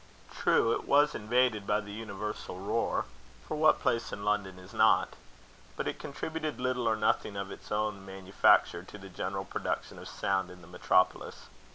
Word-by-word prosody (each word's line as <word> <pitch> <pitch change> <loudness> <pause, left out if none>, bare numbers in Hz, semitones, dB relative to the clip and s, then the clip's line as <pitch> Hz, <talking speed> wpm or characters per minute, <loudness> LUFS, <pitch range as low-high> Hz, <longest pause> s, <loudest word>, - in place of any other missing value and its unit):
True, 115 - +3
it - - -4
was 145 +1 +4
invaded 115 -1 +1
by 105 0 +2
the 100 -1 -8
universal 105 -3 -6
roar 100 +4 0 0.4
for - - -3
what 155 0 +4
place 120 -4 0
in 100 - -6
London 105 -3 0
is 90 0 -13
not? - - +4 0.7
but - - -3
it - - -3
contributed 155 +1 -4
little 125 -1 0
or 110 - +2
nothing 105 -1 0
of 100 0 -4
its - - -11
own 105 -2 -1
manufacture 95 -2 +3
to 95 +3 -11
the 95 -1 -11
general 95 +1 -4
production - - -4
of - - -9
sound 95 -1 -1
in 90 0 -12
the 80 - -14
metropolis. 90 +1 +1
105 Hz, 175 wpm, -30 LUFS, 95-115 Hz, 0.7 s, was